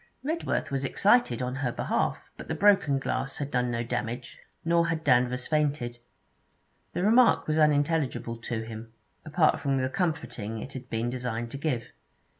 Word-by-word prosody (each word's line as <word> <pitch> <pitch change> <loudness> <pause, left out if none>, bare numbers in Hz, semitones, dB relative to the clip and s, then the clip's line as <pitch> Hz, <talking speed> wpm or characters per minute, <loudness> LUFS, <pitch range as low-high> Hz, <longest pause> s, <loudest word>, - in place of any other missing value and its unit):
Redworth 320 - -1
was 135 0 -1
excited 140 - +3
on 125 +1 -3
her 130 -2 -1
behalf, - - 0 0.2
but - - -10
the - - -2
broken 200 -9 +4
glass 135 0 -2
had 145 -1 -4
done 125 -1 +1
no 120 0 -1
damage, 120 +1 -4 0.3
nor 170 0 +3
had 165 -1 -2
Danvers 125 -2 +2
fainted. 145 -6 0 0.9
The 180 - -1
remark 235 +4 +5
was 155 0 +1
unintelligible 145 -5 +1
to 115 -1 -4
him, 115 0 -9 0.3
apart 155 +1 +3
from 140 -2 0
the 130 0 0
comforting 145 - -2
it 130 +5 -7
had 130 -1 -8
been 115 +2 -1
designed 120 -2 -3
to 140 - -5
give. 135 -6 -2
135 Hz, 165 wpm, -28 LUFS, 120-155 Hz, 0.9 s, remark